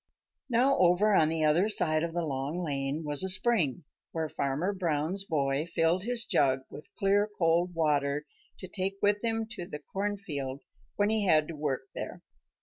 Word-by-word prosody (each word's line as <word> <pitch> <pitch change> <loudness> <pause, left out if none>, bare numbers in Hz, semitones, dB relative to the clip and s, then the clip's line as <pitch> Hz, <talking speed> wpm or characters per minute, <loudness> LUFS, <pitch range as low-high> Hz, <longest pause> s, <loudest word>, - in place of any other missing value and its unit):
Now 255 +3 +3
over 185 +4 +4
on 155 -5 +4
the 160 -1 0
other 170 +7 +3
side 155 -6 +3
of 170 0 -4
the 170 -1 -1
Long 145 +5 -3
Lane 140 0 -2
was 145 -1 +2
a 190 - -1
spring 185 - +2 0.3
where 160 -1 -2
Farmer 150 +7 -2
Brown's 175 +1 0
boy 145 -2 -1
filled 170 +3 +1
his 240 -1 0
jug 135 -2 +2
with 150 - -11
clear 200 +2 +2
cold 170 +1 +1
water 150 -2 0 0.3
to 185 - -7
take 190 +1 -3
with 205 +1 +2
him 225 -1 -1
to 185 -7 -6
the 150 - -6
cornfield 150 -6 -4 0.3
when 205 +1 +1
he 215 -2 +1
had 155 -3 +4
to 165 - -6
work 145 -3 -2
there. - - -7
170 Hz, 175 wpm, -29 LUFS, 150-195 Hz, 0.3 s, over